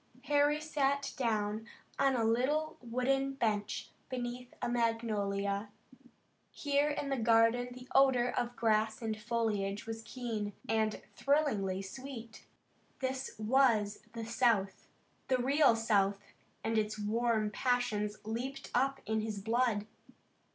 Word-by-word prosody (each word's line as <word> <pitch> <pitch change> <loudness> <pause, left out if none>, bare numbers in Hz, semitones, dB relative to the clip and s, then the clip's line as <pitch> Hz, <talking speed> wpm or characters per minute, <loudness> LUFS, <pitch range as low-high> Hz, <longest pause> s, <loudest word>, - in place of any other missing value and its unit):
Harry 290 0 +3
sat 280 -2 0
down 220 -2 -1 0.3
on 275 -1 +4
a 235 - +1
little 270 +7 +1
wooden 265 +3 0
bench 215 -5 -1 0.2
beneath 245 -1 -4
a 245 - -1
magnolia. 210 -4 0 0.8
Here 285 0 +1
in 290 -1 -2
the 270 - 0
garden 230 +1 +4
the 250 +1 -10
odor 260 -3 +5
of 245 0 -2
grass 220 -1 +2
and 220 -1 -1
foliage 215 -3 -1
was 225 0 -5
keen, 225 -4 -4
and 220 -1 0
thrillingly 210 -10 +1
sweet. 230 +2 -9 0.5
This 265 0 -3
was 220 -2 +3
the 230 -1 -5
South, 230 -5 +1 0.4
the 260 - +3
real 270 0 +4
South, 205 -3 +2 0.5
and 225 0 +1
its 215 0 -2
warm 215 0 +1
passions 215 -4 0
leaped 240 +5 -4
up 270 +2 +1
in 220 0 0
his 215 -1 -3
blood. 225 0 +1
230 Hz, 125 wpm, -33 LUFS, 215-260 Hz, 0.8 s, odor